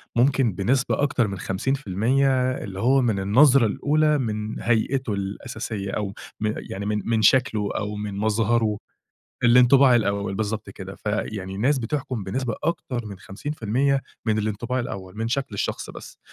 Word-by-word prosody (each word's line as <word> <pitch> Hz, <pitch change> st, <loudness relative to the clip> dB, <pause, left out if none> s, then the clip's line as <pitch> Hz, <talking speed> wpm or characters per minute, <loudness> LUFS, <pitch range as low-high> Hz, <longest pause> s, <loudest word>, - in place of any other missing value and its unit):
ممكن 125 Hz, -3 st, +3 dB
بنسبة 125 Hz, +10 st, +1 dB
أكتر 130 Hz, -5 st, +2 dB
من 100 Hz, -1 st, -5 dB
50% 130 Hz, +4 st, +1 dB
اللي 95 Hz, -1 st, -7 dB
هو 130 Hz, +4 st, +4 dB
من 110 Hz, -5 st, +1 dB
النظرة 125 Hz, +6 st, +5 dB
الأولى، 150 Hz, +7 st, +2 dB
من 110 Hz, -3 st, -3 dB
هيئِتُه 120 Hz, 0 st, 0 dB
الأساسية 100 Hz, 0 st, -4 dB
أو 100 Hz, -1 st, -3 dB, 0.3 s
من 110 Hz, 0 st, 0 dB
يعني 100 Hz, +1 st, -6 dB
من 105 Hz, -1 st, -1 dB
من 115 Hz, -1 st, +1 dB
شكله 110 Hz, -3 st, +3 dB
أو 105 Hz, 0 st, -3 dB
من 105 Hz, -1 st, -5 dB
مظهره 110 Hz, 0 st, +1 dB, 0.7 s
الإنطباع 125 Hz, +2 st, +6 dB
الأول 100 Hz, -3 st, 0 dB
بالضبط 110 Hz, +1 st, -3 dB
كده، 95 Hz, 0 st, -9 dB
فيعني 105 Hz, -2 st, -3 dB
الناس 130 Hz, +6 st, +2 dB
بتحكُم 125 Hz, -2 st, -3 dB
بنسبة 115 Hz, +3 st, -2 dB
أكتر 130 Hz, -8 st, -2 dB
من 100 Hz, -2 st, -8 dB
50% 135 Hz, +4 st, -1 dB, 0.2 s
من 110 Hz, -1 st, +1 dB
الإنطباع 110 Hz, +4 st, -2 dB
الأول، 100 Hz, -4 st, -6 dB
من 115 Hz, +1 st, -1 dB
شكل 135 Hz, -1 st, -2 dB
الشخص 100 Hz, -, -3 dB
بس، -, -, -11 dB
110 Hz, 145 wpm, -24 LUFS, 100-130 Hz, 0.7 s, الإنطباع